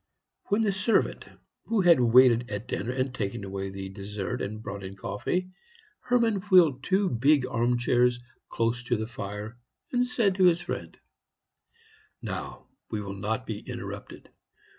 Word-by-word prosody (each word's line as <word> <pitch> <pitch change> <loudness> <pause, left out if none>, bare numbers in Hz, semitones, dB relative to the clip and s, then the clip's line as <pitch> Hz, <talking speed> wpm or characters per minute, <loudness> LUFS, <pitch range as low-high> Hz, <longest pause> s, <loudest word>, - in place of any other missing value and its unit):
When 210 +3 +1
the 210 - +2
servant 195 +4 +1 0.4
who 225 -3 +1
had 175 -6 +6
waited 120 0 +5
at 105 +3 -5
dinner 120 -1 -2
had 130 0 -1
taken 100 -4 -3
away 95 0 -4
the 95 0 -6
dessert 100 +4 -5
and 110 +2 -5
brought 100 -2 -6
in 95 +1 -7
coffee, 175 - -3 0.5
Hermann 235 -5 +1
wheeled 165 -9 +6
two 195 +1 +2
big 135 +1 +3
arm 120 -1 +1
chairs 125 0 +2 0.3
close 115 +2 0
to 120 - +1
the 110 - -2
fire, 105 +1 -7 0.3
and 245 -1 +2
said 230 -6 +1
to 190 - +5
his 175 -1 +4
friend: 85 -1 -5 1.2
"Now, - - -6 0.2
we 110 - -2
will 100 -1 -5
not 110 +5 -3
be 110 -4 -4
interrupted. - - -8
120 Hz, 155 wpm, -27 LUFS, -, 1.2 s, had